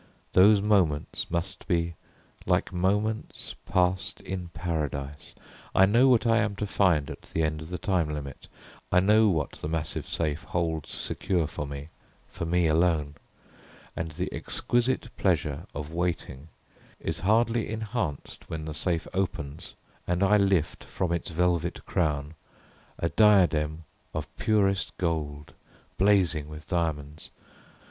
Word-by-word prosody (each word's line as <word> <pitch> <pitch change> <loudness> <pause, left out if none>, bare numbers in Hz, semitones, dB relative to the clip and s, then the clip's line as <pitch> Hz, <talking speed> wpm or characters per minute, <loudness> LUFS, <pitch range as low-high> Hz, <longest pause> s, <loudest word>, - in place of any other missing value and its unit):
Those 100 +2 +6
moments 90 -9 +1
must 85 +2 -3
be 85 -3 +1 0.5
like - - +1
moments 105 +5 -1
passed 90 +1 +1
in 90 -2 -5
Paradise. 75 -4 -4 0.4
I 95 - +7
know 115 +7 +5
what 125 -2 +4
I 115 0 +4
am 105 -2 0
to 105 - -2
find 90 -7 +2
at - - -9
the 80 - -2
end 75 0 -1
of 80 - -8
the 90 - -3
time 90 -3 0
limit. 70 -3 -6 0.4
I 90 - +6
know 105 +3 +5
what 80 -6 0
the - - -7
massive 80 0 -3
safe 80 -2 -1
holds 80 -4 -2
secure 90 -4 -1
for 75 -1 -5
me, 70 +2 -7 0.4
for - - -5
me 90 +1 +2
alone, 80 -2 +2 0.8
and 80 0 -3
the 75 - -4
exquisite 120 +2 0
pleasure - - 0
of 75 +2 -5
waiting 85 -5 -3 0.5
is - - -3
hardly 115 +3 +2
enhanced 110 - -4
when 80 -1 -4
the 80 - -5
safe 85 +1 -1
opens 80 -6 -3 0.3
and 90 +2 +1
I 100 +2 +5
lift, 95 -6 +2
from 90 -3 -2
its 85 -1 -2
velvet 85 0 0
crown, 75 -4 -1 0.6
a 85 - 0
diadem 85 -8 +4 0.3
of 80 0 -5
purest 100 -3 +1
gold, 75 -4 -2 0.5
blazing 90 -6 +3
with 75 +1 -9
diamonds. 75 -4 -2
85 Hz, 140 wpm, -27 LUFS, 75-95 Hz, 0.8 s, I